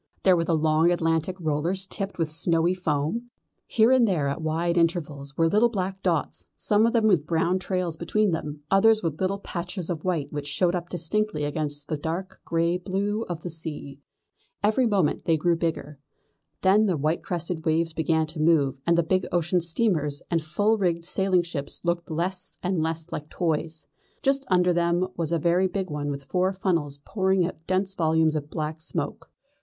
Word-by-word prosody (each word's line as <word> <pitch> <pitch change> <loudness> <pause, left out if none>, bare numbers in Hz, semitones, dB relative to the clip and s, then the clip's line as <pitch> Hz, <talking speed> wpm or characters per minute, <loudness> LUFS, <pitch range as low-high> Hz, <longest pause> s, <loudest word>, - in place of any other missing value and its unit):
There 185 -2 +6
were 165 - +1
the 165 -1 +2
long 155 +2 +3
Atlantic 165 0 0
rollers 165 +4 -1
tipped 195 +1 -4
with 165 -3 -1
snowy 165 +1 +2
foam. 180 +7 -2 0.4
Here 225 +2 +4
and 255 -3 +5
there 165 -8 +1
at 140 - -3
wide 165 +2 0
intervals 155 -5 -1
were 165 - +4
little 215 +7 +4
black 190 -3 -3
dots, 165 -6 -1
some 210 +2 +3
of 230 - 0
them 230 -2 +3
with 175 -8 +3
brown 170 +2 +1
trails 180 -3 -2
behind 200 +3 +1
them, 150 -2 -4
others 215 +2 +5
with 160 -1 -2
little 190 +1 +1
patches 180 -1 -5
of 160 -3 -4
white 170 -7 -1
which 145 -1 -4
showed 175 +4 +1
up 175 -1 -3
distinctly 180 0 -1
against 145 -1 -3
the 155 - -2
dark 165 +5 -5
grey 170 +1 +1
blue 200 +4 -2
of 170 -2 -4
the 175 - -5
sea. 150 -4 -7 0.6
Every 220 +4 +3
moment 195 -8 +1
they 165 -1 +3
grew 170 +2 +2
bigger. 160 -3 -3 0.6
Then 205 +3 +5
the 180 -4 +1
white 155 +4 0
crested 170 -2 -3
waves 165 0 +1
began 160 0 +1
to 155 +1 -8
move, 140 -5 +2
and 170 0 +4
the 170 - +4
big 185 +3 0
ocean 175 +1 +1
steamers 165 -5 0
and 165 -1 +2
full 205 +8 +1
rigged 170 -3 0
sailing 185 -1 +2
ships 155 -5 -4
looked 170 0 -1
less 180 +3 -2
and 180 -2 0
less 160 +1 -3
like 150 +1 -5
toys. 160 -1 -2 0.4
Just 275 0 +1
under 180 -1 +3
them 170 +1 +1
there 185 - -1
was 165 -2 -2
a 170 - +2
very 175 +4 +2
big 190 -1 -3
one 145 -1 -3
with 140 -1 -4
four 185 +6 0
funnels 170 -7 -1
pouring 190 -3 +1
out 165 -2 -7
dense 190 +1 0
volumes 160 -2 +2
of 150 -1 -3
black 155 0 -4
smoke. - - -4
170 Hz, 190 wpm, -26 LUFS, 155-185 Hz, 0.6 s, There